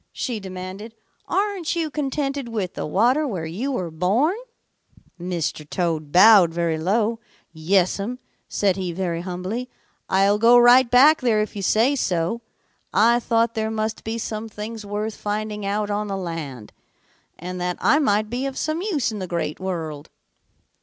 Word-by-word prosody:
she 235 -4 -3
demanded. 190 +3 -8 0.3
'Aren't 390 -5 -1
you 325 -3 -2
contented 275 -2 -2
with 210 -6 -3
the - - -4
water 245 - +2
where 185 -10 -4
you 210 +13 -3
were 180 -10 -3
born?' 200 - +1 0.9
"Mr. 170 -4 -3
Toad 160 -5 -2
bowed 190 -1 +7
very 165 -1 -1
low. 215 +6 0 0.3
'Yes'm,' 190 +7 0 0.3
said 195 -2 +1
he 185 -2 -3
very 170 -2 -2
humbly. 185 +8 -4 0.4
'I'll 195 +2 +3
go 235 +2 +6
right 245 +1 +6
back 280 +6 +6
there 230 -4 +2
if 215 0 -2
you 200 - -4
say 230 +8 +3
so. 180 -1 -1 0.5
I 235 +4 +4
thought 230 -1 +1
there 220 0 -1
must 220 0 -3
be 225 +1 -3
some 220 0 -5
things 215 +1 -7
worth 210 +2 -3
finding 210 0 -3
out 205 +1 -1
on 210 +1 -1
the 195 -1 -3
land, 155 - -6 0.6
and 180 +1 -6
that 180 0 -2
I 300 - +4
might 215 -7 +2
be 250 +5 -3
of 270 - -6
some 315 +2 -2
use 330 - -1
in 215 - -5
the 185 - -4
Great 170 -3 -3
World.' 160 -6 -5
210 Hz, 160 wpm, -23 LUFS, 180-235 Hz, 0.9 s, bowed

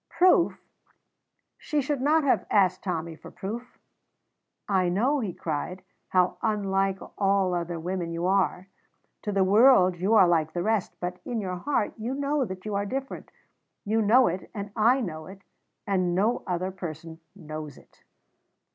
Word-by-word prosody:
Proof! 360 -1 +3 1.0
She 300 - -1
should 280 -1 -1
not 305 +3 +3
have 275 - +1
asked 185 -3 +2
Tommy 170 -3 -3
for - - -12
proof. 235 +5 -7 0.9
"I 185 -3 +2
know," 250 +11 +1
he 215 -7 -2
cried, 170 +3 -4 0.3
"how 180 -1 +2
unlike 195 -3 0 0.2
all 195 -2 +2
other 170 -1 -3
women 175 0 -3
you 170 +1 -3
are. 190 -1 +1 0.5
To 210 - -3
the 195 -1 +2
world 195 -2 +5
you 195 +6 +2
are 190 -4 +7
like 160 -2 +1
the 175 - -2
rest, 220 -2 0
but 180 0 -4
in 240 -2 -3
your 185 -3 -3
heart 255 +1 -1
you 240 +5 -3
know 285 0 0
that 185 -2 -8
you 210 - -3
are 200 0 0
different; 270 +5 -5 0.6
you 220 +2 +1
know 230 +5 +5
it, 180 +2 -3
and 200 -1 -5
I 240 +4 +3
know 155 -7 -5
it, 195 +1 -12 0.4
and 185 -3 0
no 215 +6 +1
other 185 +1 -2
person 165 -3 -8 0.2
knows 155 -4 -8
it." - - -21
195 Hz, 165 wpm, -26 LUFS, 180-225 Hz, 1.0 s, are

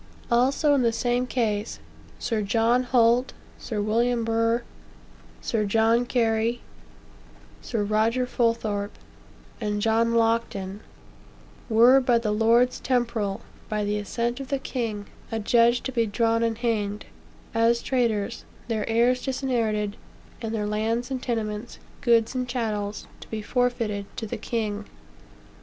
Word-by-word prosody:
Also, 270 +5 +3
in 280 - +3
the 235 -1 +3
same 245 +2 0
case, 215 - -1 0.4
Sir 225 -2 -1
John 225 +4 +2
Holt, 245 0 +3 0.3
Sir 220 -3 -4
William 230 +2 +1
Burgh, 230 +1 +1 0.8
Sir 225 -2 0
John 225 +3 +2
Cary, 230 -1 +1 1.0
Sir 225 -4 -2
Roger 220 +4 +1
Fulthorpe, 230 -4 -1 0.6
and 210 -1 -1
John 230 +2 +2
Locton, 225 -4 0 0.9
"were 235 +4 +7
by 245 -2 +3
the 225 -2 -1
lords 230 +4 +3
temporal, 235 -6 -1 0.3
by 210 -1 -1
the 205 +1 -1
assent 235 +4 -2
of 270 - -6
the 275 - 0
king, 230 -6 -4 0.3
adjudged 235 +2 +3
to 265 - -3
be 230 -3 +1
drawn 230 +2 +1
and 230 -1 0
hanged, 215 -3 -1 0.5
as 230 +1 +2
traitors, 235 -3 0 0.3
their 220 -2 -1
heirs 240 +3 +2
disinherited, 230 -6 -1 0.4
and 225 -2 -3
their 210 -1 -1
lands 225 +4 -1
and 260 -1 -2
tenements, 220 -2 -3 0.2
goods 230 -1 +3
and 250 -1 -2
chattels, 215 -4 -2
to - - -12
be 215 -1 -4
forfeited 230 -5 -1
to 225 - -3
the 230 +2 -4
king." 215 -2 -3
230 Hz, 130 wpm, -25 LUFS, 215-245 Hz, 1.0 s, were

